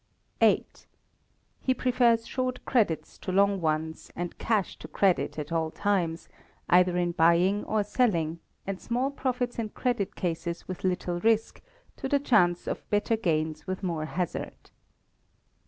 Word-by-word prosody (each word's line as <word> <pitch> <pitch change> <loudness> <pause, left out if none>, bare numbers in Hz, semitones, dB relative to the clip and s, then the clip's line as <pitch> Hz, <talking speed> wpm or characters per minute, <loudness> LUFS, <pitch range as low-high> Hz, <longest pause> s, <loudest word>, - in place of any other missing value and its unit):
viii. - - +4 0.9
He 260 - +1
prefers 240 -3 +3
short 255 0 -3
credits 210 -11 0
to 185 - -4
long 200 0 +3
ones; 160 0 -2
and 175 0 -4
cash 215 -4 0
to - - -9
credit 190 -5 +1
at 150 +1 -5
all 165 -1 0
times, 175 -3 -1 0.4
either 180 0 +4
in 175 -1 +1
buying 170 +5 +3
or 215 -1 +1
selling; 185 -7 +1 0.3
and 195 -1 -4
small 250 +3 -1
profits 250 -3 -2
in 220 -2 -2
credit 240 -4 -2
cases 170 -1 -3
with 185 - -6
little 180 -1 -1
risk, 225 +3 +1 0.4
to 265 - -4
the 285 - +4
chance 180 -11 +3
of - - -5
better 210 +2 +2
gains 160 -6 -1
with 185 +1 -4
more 165 -4 -1
hazard. 175 +2 -4
185 Hz, 145 wpm, -28 LUFS, 170-230 Hz, 0.9 s, viii